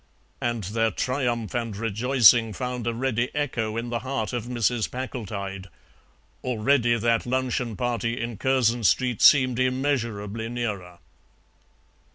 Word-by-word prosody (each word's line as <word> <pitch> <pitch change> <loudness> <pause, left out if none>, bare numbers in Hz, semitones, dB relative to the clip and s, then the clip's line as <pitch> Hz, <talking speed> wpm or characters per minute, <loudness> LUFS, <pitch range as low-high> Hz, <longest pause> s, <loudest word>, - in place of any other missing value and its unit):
And 120 -3 -1
their 115 +4 0
triumph 120 -2 -2
and 115 -4 -3
rejoicing 115 +1 +4
found 125 -1 -4
a 120 - 0
ready 125 0 0
echo 115 -7 -2
in 120 +1 -4
the 120 - -1
heart 130 -2 -3
of 120 -2 -3
Mrs. 120 -2 0
Packletide; 100 -7 -5 0.8
already 120 0 +2
that 115 +1 +1
luncheon 125 -2 -1
party 120 -1 -2
in 115 -2 -4
Curzon 120 -2 +1
Street 120 +5 +2
seemed 130 -4 +6
immeasurably 115 -5 -1
nearer. 105 -8 -4
120 Hz, 125 wpm, -25 LUFS, 110-125 Hz, 0.8 s, seemed